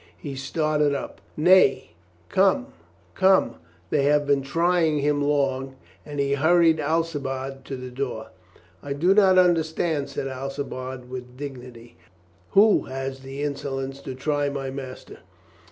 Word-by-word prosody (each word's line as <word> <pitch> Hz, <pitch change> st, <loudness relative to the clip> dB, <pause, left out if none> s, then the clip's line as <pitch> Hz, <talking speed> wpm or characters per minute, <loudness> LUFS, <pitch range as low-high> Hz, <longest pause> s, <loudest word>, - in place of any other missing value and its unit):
He 140 Hz, -2 st, -7 dB
started 150 Hz, +1 st, 0 dB
up. -, -, -6 dB, 0.2 s
"Nay, 175 Hz, -, +4 dB, 0.4 s
come, 200 Hz, -, +2 dB, 0.4 s
come, 190 Hz, 0 st, +3 dB, 0.3 s
they 145 Hz, -, +2 dB
have 145 Hz, 0 st, +3 dB
been 140 Hz, -1 st, +2 dB
trying 165 Hz, +2 st, +1 dB
him 145 Hz, 0 st, +1 dB
long." 135 Hz, -2 st, 0 dB, 0.3 s
And 145 Hz, -1 st, -6 dB
he 140 Hz, 0 st, +1 dB
hurried 160 Hz, +2 st, +4 dB
Alcibiade 140 Hz, -4 st, -2 dB
to 135 Hz, -, -5 dB
the 130 Hz, -1 st, -8 dB
door. 125 Hz, -4 st, -4 dB, 0.5 s
"I 140 Hz, -, -4 dB
do 170 Hz, +7 st, +3 dB
not 195 Hz, -2 st, +5 dB
understand," 160 Hz, -4 st, +2 dB
said 135 Hz, -, -4 dB
Alcibiade 130 Hz, -1 st, -5 dB
with 125 Hz, 0 st, -8 dB
dig 140 Hz, -2 st, -6 dB
nity. 120 Hz, -1 st, -13 dB, 0.6 s
"Who 210 Hz, +2 st, +5 dB
has 135 Hz, 0 st, -5 dB
the 135 Hz, +2 st, -7 dB
insolence 135 Hz, -1 st, -4 dB
to 130 Hz, -2 st, -7 dB
try 145 Hz, +1 st, -1 dB
my 135 Hz, -1 st, -4 dB
master?" 130 Hz, -1 st, -9 dB
140 Hz, 135 wpm, -24 LUFS, 135-160 Hz, 0.6 s, not